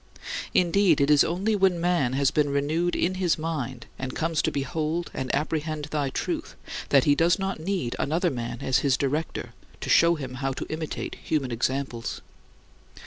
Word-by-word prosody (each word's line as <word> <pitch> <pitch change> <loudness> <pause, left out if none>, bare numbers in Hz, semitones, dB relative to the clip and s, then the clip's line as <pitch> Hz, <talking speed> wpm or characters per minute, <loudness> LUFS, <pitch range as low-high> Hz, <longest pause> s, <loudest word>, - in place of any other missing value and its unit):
Indeed, 180 -2 +4
it 140 +1 +3
is 145 -1 +7
only 190 +6 0
when 190 -3 +3
man 170 -8 +1
has 135 0 +2
been 150 -1 +2
renewed 155 +5 0
in 180 - +1
his 175 -3 +2
mind, 155 -6 -4
and 130 0 -4
comes 165 -1 0
to - - +1
behold 155 +4 -2
and 130 -1 -3
apprehend 155 +1 -2
thy 145 -3 0
truth, - - -3 0.3
that 135 -2 +5
he 145 - +5
does 165 +3 +3
not 195 -3 -2
need 165 -8 -2
another 170 +4 +1
man 120 -1 -4
as 130 +1 +2
his 135 -1 +2
director, 145 +4 -2 0.3
to - - -5
show 170 +1 +6
him 135 -5 -6
how 135 0 0
to - - -5
imitate 155 0 -4
human 140 -5 -1
examples. 120 0 -2
150 Hz, 175 wpm, -26 LUFS, 135-170 Hz, 0.3 s, is